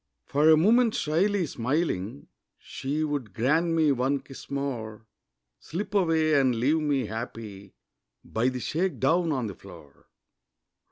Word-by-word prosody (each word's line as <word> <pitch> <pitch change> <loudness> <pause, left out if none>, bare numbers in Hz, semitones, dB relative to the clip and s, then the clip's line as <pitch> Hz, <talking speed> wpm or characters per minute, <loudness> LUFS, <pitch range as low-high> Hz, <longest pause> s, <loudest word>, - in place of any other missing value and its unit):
For 150 +3 +3
a 160 - +7
moment 225 +7 +4
shyly 180 +5 +1
smiling, 120 - -2 0.3
She 145 +4 -4
would 140 -10 -3
grant 150 +9 +2
me 160 -3 +3
one 135 +2 +1
kiss 135 - -12
more 115 -6 -4 0.5
Slip 195 +5 -5
away 165 -5 +2
and 135 -4 +3
leave 140 +8 +2
me 145 -5 0
happy 105 -3 -7 0.5
By 115 +3 0
the 130 -1 -5
shake 170 +8 -2
down 170 0 +2
on 130 -5 -1
the 100 - -5
floor. 80 -8 -15
140 Hz, 135 wpm, -27 LUFS, 115-160 Hz, 0.5 s, a